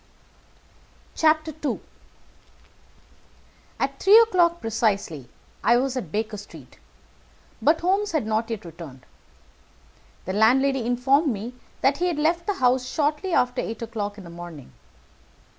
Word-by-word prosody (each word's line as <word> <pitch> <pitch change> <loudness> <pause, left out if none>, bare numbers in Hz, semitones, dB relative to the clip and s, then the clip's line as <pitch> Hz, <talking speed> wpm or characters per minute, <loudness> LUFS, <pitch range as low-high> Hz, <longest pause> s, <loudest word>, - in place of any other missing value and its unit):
II 310 -1 +1 2.0
At 275 0 -2
three 400 +3 +7
o'clock 360 -7 +4
precisely 200 - -1 0.3
I 235 - +5
was 260 +1 -1
at 195 -12 -5
Baker 215 +2 -2
Street, 205 - -13 0.8
but 320 +3 +3
Holmes 390 +4 +1
had 310 -8 0
not 220 +1 -1
yet 225 -5 -5
returned. 160 -6 -11 1.2
The 185 - -3
landlady 255 +4 +3
informed 270 +5 +2
me 225 +3 -5 0.3
that 275 +1 +3
he 360 - +1
had 345 -4 -1
left 335 +3 0
the 410 - 0
house 255 -2 +2
shortly 300 +6 -1
after 250 -5 +1
eight 225 +1 -5
o'clock 210 -2 -4
in 200 - -10
the 170 - -11
morning. 170 -5 -10
250 Hz, 125 wpm, -24 LUFS, 215-310 Hz, 2.0 s, three